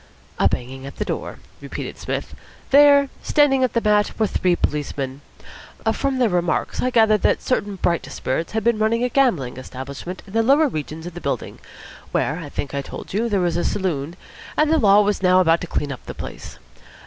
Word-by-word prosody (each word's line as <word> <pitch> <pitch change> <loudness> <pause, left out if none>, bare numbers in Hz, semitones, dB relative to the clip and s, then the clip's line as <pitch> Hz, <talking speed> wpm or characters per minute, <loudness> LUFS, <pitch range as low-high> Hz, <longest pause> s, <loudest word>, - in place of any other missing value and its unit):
"A - - +5
banging 130 +2 -5
at 140 - -9
the - - -3
door," - - -4 0.2
repeated - - -6
Psmith. - - -4 0.4
"There, 285 0 +7
standing 270 -3 +3
on 255 - +3
the 235 - +1
mat, 210 -1 +2
were 220 - +2
three 180 -3 +1
policemen. 140 -3 -3 0.7
From 275 -1 -1
their 250 -2 +3
remarks 175 -4 0
I 255 - +1
gathered 220 -4 +4
that - - +2
certain 205 -5 -1
bright 170 -2 0
spirits 140 +8 -3
had 220 -1 -1
been 235 -1 +2
running 225 +2 +1
a 250 - +1
gambling 185 - +1
establishment 135 +7 -7
in 195 - -14
the 225 - +3
lower 280 +7 +4
regions 155 - -5
of 175 - -7
the 175 - -8
building - - -3 0.5
where, 155 +4 0
I 150 -4 -7
think 140 0 -5
I 140 - -1
told 140 - -9
you, 230 +4 0
there 195 -4 +1
is 170 -1 0
a 175 - 0
saloon 170 -5 -2 0.4
and 305 0 +3
the 320 - +4
Law 205 -3 +6
was 205 -1 0
now 185 -1 +5
about 165 -2 +3
to 180 - -5
clean 145 -3 -2
up 130 - -8
the - - -6
place. - - -8
190 Hz, 205 wpm, -22 LUFS, 155-235 Hz, 0.7 s, There